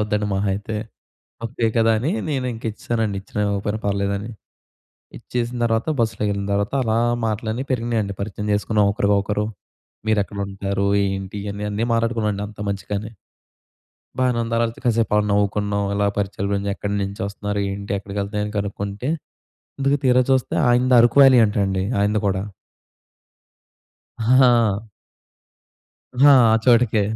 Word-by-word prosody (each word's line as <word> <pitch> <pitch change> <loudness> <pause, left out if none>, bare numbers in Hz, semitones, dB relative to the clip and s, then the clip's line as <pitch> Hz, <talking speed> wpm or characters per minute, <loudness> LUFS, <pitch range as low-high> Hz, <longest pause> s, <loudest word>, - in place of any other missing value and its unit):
అవుద్దండి, 105 0 0
మహాయితే 100 +2 -2 0.7
ముప్పయే 115 0 -1
కదా! 115 0 +4
అని 130 +8 -1 0.2
నేనింకా 125 -6 -3
ఇచ్చేసానండి. 110 -2 -2
ఇచ్చిన 100 - -8
ఇవ్వకపోయినా 100 +1 -2
పర్లేదని. 100 +2 -1 0.9
ఇచ్చేసిన 120 0 -3
తర్వాత 115 +2 0
బస్సులో 110 -2 -1
వెళ్ళిన 100 0 -3
తర్వాత, 100 +3 -1
అలా 110 -1 +1 0.3
మాటలన్నీ 110 +4 -3
పెరిగినాయండి. 115 -4 -1
పరిచయం 105 +1 -4
చేసుకున్నాం 105 0 +1
ఒకరికి 100 0 +2
ఒకరు. 105 +1 -1 0.6
"మీరెక్కడ 105 -2 0
ఉంటారు? 100 0 -2 0.2
ఏంటి?" 95 +1 -4
అని 105 +1 -5
అన్నీ 105 +3 -1
మాట్లాడుకున్నాండి 115 -3 0
అంత 105 0 -14
మంచిగానే. 100 +2 -4 1.1
బానే 125 -2 +2
ఉంది, 115 0 -3
ఆ - - +2
తర్వాత 115 0 -1
కాసేపు 115 -3 +2 0.2
నవ్వుకున్నాం. 100 0 0
ఇలా 100 0 +1
పరిచయాలు 100 0 -2
పెంచ్ 100 0 -2
"ఎక్కడ 100 - -5
నుంచొస్తున్నారు? 100 +1 -3
ఏంటి? 100 +1 -5
ఎక్కడికి 100 +1 -7
వెళ్తారు?" 105 +1 -3
అని 105 - -6
కనుక్కుంటే, 100 +4 -3 0.7
ఇంతకు 140 +1 +2
తీరాచూస్తే 130 +1 +2
ఆయనది 125 +1 +4
అరకు 120 +1 +3
వ్యాలీ 135 -2 +7
అంట 105 - -4
అండి, 95 -1 -1 0.2
ఆయనది 105 +1 +1
కూడా. 95 -1 -1 1.8
హా! 115 -3 +3 1.3
హా! 145 0 +9 0.2
ఆ - - +4
చోటకే. 120 -3 +4
105 Hz, 130 wpm, -21 LUFS, 100-115 Hz, 1.8 s, హా